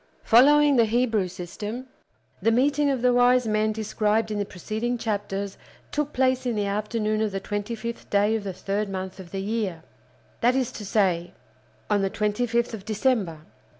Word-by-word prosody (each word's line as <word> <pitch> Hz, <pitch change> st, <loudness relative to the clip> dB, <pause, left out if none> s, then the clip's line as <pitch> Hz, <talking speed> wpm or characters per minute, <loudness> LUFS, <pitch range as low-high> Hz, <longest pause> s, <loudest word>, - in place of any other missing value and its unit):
Following 285 Hz, +4 st, +6 dB
the 230 Hz, -, +6 dB
Hebrew 225 Hz, -3 st, +1 dB
system, 205 Hz, +7 st, -6 dB, 0.6 s
the -, -, +3 dB
meeting 285 Hz, +4 st, +2 dB
of 260 Hz, -3 st, -1 dB
the 250 Hz, 0 st, +4 dB
wise 245 Hz, 0 st, +4 dB
men 215 Hz, 0 st, +1 dB
described 215 Hz, 0 st, 0 dB
in 210 Hz, -, -2 dB
the 205 Hz, -, 0 dB
preceding 220 Hz, +7 st, -3 dB
chapters 200 Hz, -3 st, -3 dB, 0.3 s
took 295 Hz, 0 st, -1 dB
place 260 Hz, -1 st, +1 dB
in 240 Hz, -, 0 dB
the 205 Hz, -1 st, 0 dB
afternoon 215 Hz, +1 st, -1 dB
of 215 Hz, -1 st, 0 dB
the 195 Hz, -, -2 dB
twenty 205 Hz, +3 st, -3 dB
fifth 230 Hz, +1 st, -6 dB
day 205 Hz, +2 st, +3 dB
of 220 Hz, -, -2 dB
the 195 Hz, -, -3 dB
third 200 Hz, +3 st, -2 dB
month 190 Hz, 0 st, -5 dB
of 185 Hz, -2 st, -10 dB
the 195 Hz, +1 st, -4 dB
year; 200 Hz, -6 st, -2 dB, 0.6 s
that 245 Hz, +2 st, +3 dB
is 260 Hz, -2 st, 0 dB
to 210 Hz, -, -8 dB
say, 180 Hz, -5 st, +1 dB, 0.5 s
on 205 Hz, -1 st, +2 dB
the 195 Hz, -, +1 dB
twenty 210 Hz, +4 st, -1 dB
fifth 235 Hz, +1 st, 0 dB
day 225 Hz, -, -4 dB
of -, -, -15 dB
December. 210 Hz, -, 0 dB
215 Hz, 185 wpm, -25 LUFS, 200-245 Hz, 0.6 s, Following